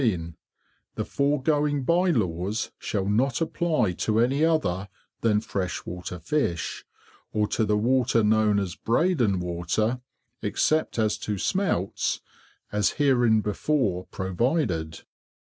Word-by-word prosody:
The - - -2
foregoing 145 0 +1
Bye 175 +6 +3
laws 100 - -1
shall 100 -3 -2
not 115 +6 +1
apply 160 - +1
to 110 0 +1
any 135 +6 +2
other 105 - +1 0.3
than 105 -2 +2
fresh 95 -5 -3
water 90 0 -6
Fish, 85 - -2 0.5
or 105 -1 +1
to 110 - +1
the 105 0 +2
water 120 0 +2
known 105 -1 +3
as 95 -3 -1
Breydon 120 - +1
Water, 90 +8 -1 0.4
except 120 +10 +1
as 110 -2 +1
to 105 -1 -3
Smelts, 100 - 0 0.5
as 105 -3 +1
hereinbefore 115 -5 +2
provided. 95 - -1
110 Hz, 115 wpm, -26 LUFS, 95-140 Hz, 0.5 s, Bye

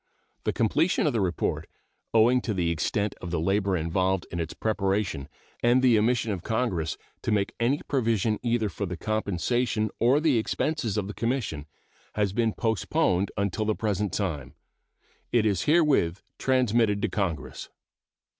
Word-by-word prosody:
The - - +2
completion 150 - +1
of 150 - +2
the 115 - +1
report, 90 -3 -1 0.4
owing 120 +3 +4
to 110 -4 -2
the 85 -2 +1
extent 100 +5 -1
of 90 - -5
the 85 -1 -1
labor 95 +2 +1
involved 95 +3 0
in 85 - -3
its 80 -1 -4
preparation 100 -9 -1 0.3
and 120 +2 +4
the 125 -3 +6
omission 115 0 +1
of 95 -4 -3
Congress 95 - -1 0.2
to - - -2
make 100 -2 +1
any 125 +5 +1
provision 115 -5 +1
either 120 -2 +1
for 100 0 -4
the 90 -1 -5
compensation 110 +2 -1
or 125 +5 +4
the 150 -6 +3
expenses 120 -1 -1
of 105 - 0
the 105 - -5
Commission, 115 - -2 0.5
has 100 -2 0
been 115 0 +1
postponed 110 - +1
until 100 +1 -1
the 110 0 +1
present 105 -2 -1
time. 75 -8 -3 0.8
It 115 -3 +3
is 100 -4 +1
herewith 145 - +3 0.2
transmitted 120 -5 +2
to - - +3
Congress. 80 - -3
105 Hz, 155 wpm, -27 LUFS, 95-120 Hz, 0.8 s, the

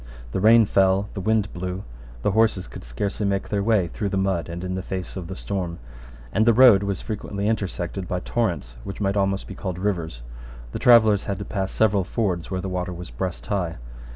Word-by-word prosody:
The - - -1
rain 110 +3 +7
fell: 95 +1 +2
the 95 - -4
wind 110 0 +1
blew: 90 +2 -4 0.4
the - - +2
horses 110 -3 +2
could - - -10
scarcely 65 - -3
make 100 -1 -1
their 100 -1 0
way 100 -4 +2
through 100 +4 -3
the 100 - -1
mud, 95 -4 0
and 85 +1 -5
in 90 0 -3
the 95 - -2
face 95 0 -5
of 90 -3 -5
the 95 - -6
storm; 90 -4 -3 0.6
and 110 - +3
the 115 - +6
road 120 -5 +8
was 100 -2 -2
frequently 100 -1 -3
intersected 95 -3 -2
by 90 - -1
torrents 90 - -2
which 95 - -7
might 100 -1 0
almost 95 -1 0
be - - -8
called 95 -2 -5
rivers. 85 -10 -2 0.5
The - - -4
travellers 110 -4 +6
had 100 - -2
to 100 - -6
pass 95 -2 -2
several 105 -3 +2
fords 90 -3 -2
where 95 -1 -2
the 95 - -4
water 90 -1 -2
was 90 -5 -8
breast - - -4
high. 90 -1 -1
95 Hz, 210 wpm, -24 LUFS, 90-105 Hz, 0.6 s, road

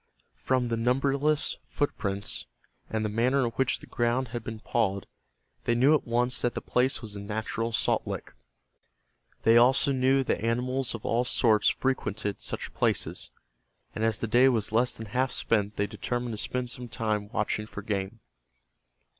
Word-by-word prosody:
From 130 -2 0
the 115 - 0
numberless 140 +5 +1
footprints, 100 -9 +1 0.4
and 110 -1 -1
the - - +1
manner 120 +6 +2
in 115 - -1
which 130 +2 0
the - - -10
ground 120 +1 0
had 120 -1 -5
been 110 -1 -6
pawed, 100 -4 0 0.6
they 120 - +2
knew 130 +6 +5
at 150 - +1
once 120 +2 +1
that 120 - 0
the - - -1
place 125 0 +1
was 105 -2 -7
a - - -5
natural 110 +2 -3
salt - - +1
lick. - - -5 1.1
They 115 +1 +6
also 130 +3 +5
knew 135 +1 +3
that 125 - -1
animals 125 +2 0
of 115 - -9
all 120 +2 +2
sorts 115 -3 +3
frequented 105 -6 -2
such - - -4
places, - - -1 0.6
and 110 - -3
as 115 -2 +2
the - - -2
day 125 +4 +5
was 115 -5 0
less 120 +3 +3
than 110 - -7
half 125 +5 0
spent 105 -2 0
they 100 - +1
determined 120 +3 -3
to - - -5
spend 125 -1 -3
some 125 -1 -6
time 110 -2 -2
watching 105 -1 -1
for 100 - -8
game. 100 +2 -3
115 Hz, 170 wpm, -28 LUFS, 110-125 Hz, 1.1 s, They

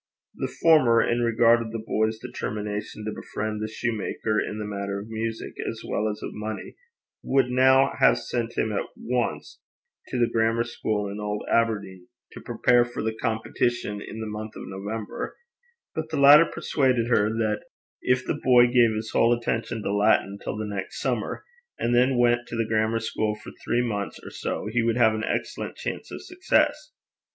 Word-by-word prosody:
The - - -4
former, 140 -8 +6
in 120 +1 0
regard 115 0 +4
of 110 -1 -5
the 115 - -3
boy's 110 0 0
determination 105 0 -5
to 110 - -2
befriend 105 0 -4
the 110 - -2
shoemaker 110 -1 -2
in 105 - -5
the 105 - -4
matter 100 -1 -3
of 105 +2 -9
music 115 0 -4 0.2
as - - -7
well 110 +1 -1
as 105 - -6
of - - -5
money, 110 +1 -6 0.5
would 130 -2 +2
now 130 +2 +5
have - - +5
sent 120 -1 -3
him 110 - +1
at 100 - -2
once 115 -12 -2 0.5
to - - -3
the 120 - +4
grammar 115 +1 +1
school 110 -3 -2
in 100 +1 -6
Old 105 0 -3
Aberdeen, 100 -6 0 0.2
to - - -10
prepare 120 -1 +3
for 120 -2 -5
the 110 0 -1
competition 110 -2 -1
in 110 - -8
the - - -3
month 110 0 -6
of - - -7
November; 100 +3 -5 0.6
but 160 0 -4
the 160 - -3
latter 145 +4 +8
persuaded 130 -5 +1
her 105 -3 +3
that 110 -1 -1 0.4
if 130 0 +1
the - - -2
boy 125 -2 +7
gave 120 -2 +4
his 110 0 -4
whole 115 - +4
attention 115 -1 -1
to 100 - -1
Latin 100 -1 +2
till - - -4
the 110 - -3
next 100 -2 -5
summer, - - -2 0.3
and 120 - 0
then 125 +1 +3
went 120 0 +3
to - - -6
the 115 -1 0
grammar 110 +1 +1
school 110 -1 -1
for 105 - -11
three 120 +1 +1
months 100 -4 -3
or - - -9
so, - - -4
he 115 +3 0
would 115 0 +1
have 110 -3 +5
an 110 0 -3
excellent - - -3
chance - - -5
of - - -7
success. 305 -4 +1
115 Hz, 185 wpm, -25 LUFS, 105-120 Hz, 0.6 s, latter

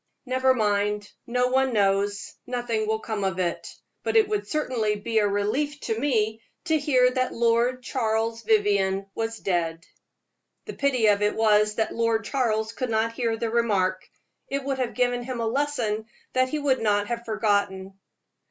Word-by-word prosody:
"Never 260 0 +2
mind, 205 -1 0 0.2
no 250 +1 +1
one 265 0 +2
knows 200 -1 +1
nothing 240 -3 -2
will 220 0 +1
come 215 -3 -3
of 190 -2 -1
it; 175 -2 -2 0.3
but - - -2
it 440 -2 +5
would 420 -1 -2
certainly 240 -8 0
be 220 +2 0
a 205 - +3
relief 235 +9 -1
to 225 0 -2
me 225 -5 0 0.2
to 320 -1 +2
hear 255 -4 +3
that 255 0 -1
Lord 235 +2 +2
Charles 225 -2 -1
Vivianne 200 -3 +2
was 225 0 -3
dead." 170 -4 -2 0.8
The - - -6
pity 265 -5 +1
of 205 -1 +4
it 210 0 +1
was 210 -1 +3
that 220 0 -1
Lord 230 -1 0
Charles 220 -5 0
could 255 -2 -3
not 225 +1 0
hear 230 -1 -1
the 225 0 -2
remark; 195 -6 0 0.4
it 275 0 -2
would 270 -1 -2
have 245 -2 -2
given 245 -1 +1
him 245 0 -5
a 230 - -1
lesson 225 -4 -1 0.3
that 255 0 +2
he 305 - -2
would 280 -3 +1
not 205 -2 +2
have 235 +2 -4
forgotten. 200 -3 0
225 Hz, 170 wpm, -25 LUFS, 210-255 Hz, 0.8 s, it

